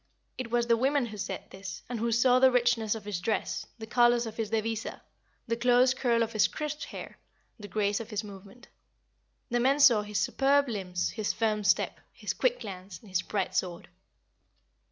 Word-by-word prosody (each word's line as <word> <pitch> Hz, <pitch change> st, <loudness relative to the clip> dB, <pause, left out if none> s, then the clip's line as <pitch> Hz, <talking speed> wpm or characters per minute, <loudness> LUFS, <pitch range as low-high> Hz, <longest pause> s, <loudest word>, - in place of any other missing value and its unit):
It 255 Hz, -2 st, -5 dB
was 240 Hz, 0 st, +1 dB
the 235 Hz, -1 st, +3 dB
women 270 Hz, +2 st, +2 dB
who 215 Hz, -2 st, -8 dB
said -, -, -4 dB
this, 190 Hz, -1 st, -8 dB
and 245 Hz, -2 st, -4 dB
who 230 Hz, +1 st, 0 dB
saw 245 Hz, +2 st, +4 dB
the 260 Hz, 0 st, +7 dB
richness 240 Hz, -3 st, +2 dB
of 220 Hz, -, -8 dB
his 205 Hz, -4 st, -3 dB
dress, 215 Hz, +4 st, -2 dB
the 220 Hz, -, -7 dB
colors 240 Hz, +1 st, +3 dB
of 225 Hz, -, -7 dB
his 225 Hz, -2 st, -3 dB
devisa, 225 Hz, 0 st, -2 dB, 0.5 s
the 230 Hz, -, 0 dB
close 250 Hz, +2 st, +4 dB
curl 235 Hz, -3 st, +1 dB
of 225 Hz, -, -4 dB
his 215 Hz, -, +4 dB
crisp 300 Hz, 0 st, -5 dB
hair, -, -, -9 dB, 0.4 s
the 205 Hz, -, -8 dB
grace 205 Hz, -1 st, 0 dB
of 230 Hz, -1 st, -7 dB
his 210 Hz, -1 st, -3 dB
movement. 200 Hz, +3 st, -12 dB, 0.8 s
The 240 Hz, -, +2 dB
men 270 Hz, +4 st, +3 dB
saw 235 Hz, -7 st, +7 dB
his 210 Hz, 0 st, -4 dB
superb 275 Hz, +10 st, +2 dB
limbs, 185 Hz, -6 st, -2 dB
his 215 Hz, -2 st, -2 dB
firm 215 Hz, -2 st, 0 dB
step, 200 Hz, -, +2 dB
his -, -, -4 dB
quick -, -, 0 dB
glance, 185 Hz, -1 st, -8 dB
his 185 Hz, -2 st, -2 dB
bright 200 Hz, -3 st, -2 dB
sword. 175 Hz, -1 st, -2 dB
225 Hz, 190 wpm, -29 LUFS, 205-245 Hz, 0.8 s, the